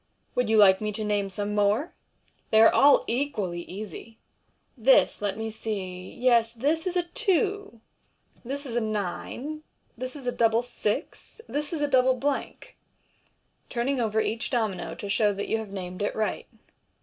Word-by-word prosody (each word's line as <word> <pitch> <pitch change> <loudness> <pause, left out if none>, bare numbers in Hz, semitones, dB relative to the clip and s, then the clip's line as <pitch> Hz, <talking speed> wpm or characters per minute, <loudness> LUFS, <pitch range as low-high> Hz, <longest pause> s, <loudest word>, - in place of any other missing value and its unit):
Would 250 -3 0
you 220 - +4
like 195 -2 +6
me 210 0 -1
to 215 +1 -3
name 205 -2 0
some 205 +2 -3
more? 210 - +1 0.6
They 220 - +5
are 225 - +7
all 285 +1 +6
equally 215 -9 -2
easy. 210 +4 -9 0.6
This, 260 -2 +4
let 200 -1 -2
me 220 0 -3
see 185 -4 -5
— - - -15
yes, 235 -2 +3
this 305 +9 0
is 365 0 -1
a 355 - +2
two 385 - -1 0.3
} - - -35
this 280 +4 -5
is 240 -3 -5
a 240 - +2
ninej 220 - -4 0.3
this 255 +3 -6
is 275 -3 -9
a 245 - +1
double 230 0 +2
six; 240 - -4
this 295 +1 -3
is 315 -3 -2
a - - +2
double 260 -1 +4
blank 275 +2 -3 0.5
$" - - -42
turning 255 +2 -1
over 220 -1 +1
each 225 +1 -1
domino 220 -7 -2
to 205 - -7
show 210 0 +2
that 200 - -4
you 225 - 0
have 220 -2 -7
named 185 -1 -6
it 205 - -1
right. 220 -1 -2
225 Hz, 180 wpm, -26 LUFS, 205-265 Hz, 0.6 s, are